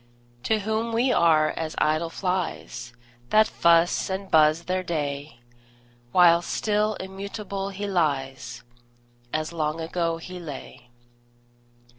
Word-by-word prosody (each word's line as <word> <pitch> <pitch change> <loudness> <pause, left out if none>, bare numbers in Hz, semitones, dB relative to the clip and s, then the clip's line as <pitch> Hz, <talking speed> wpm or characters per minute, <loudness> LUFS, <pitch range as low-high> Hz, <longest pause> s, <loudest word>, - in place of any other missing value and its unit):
To 220 -1 +2
whom 220 +2 -1
we 245 +3 +2
are 155 -5 +4
as 160 -1 -4
idle 155 +2 +1
flies, 175 -10 -3 0.4
That 215 0 +6
fuss 170 +2 +3
and 190 0 -4
buzz 155 +1 +5
their 185 +1 -1
day; 145 -6 -4 0.7
While 170 0 +6
still 210 +3 0
immutable 195 +1 -5
he 200 +1 -5
lies, 135 -9 -1 0.7
As 155 +2 -2
long 155 -1 -1
ago 165 0 -1
he 180 +2 -8
lay. 145 -6 -9
170 Hz, 115 wpm, -25 LUFS, 155-195 Hz, 0.7 s, That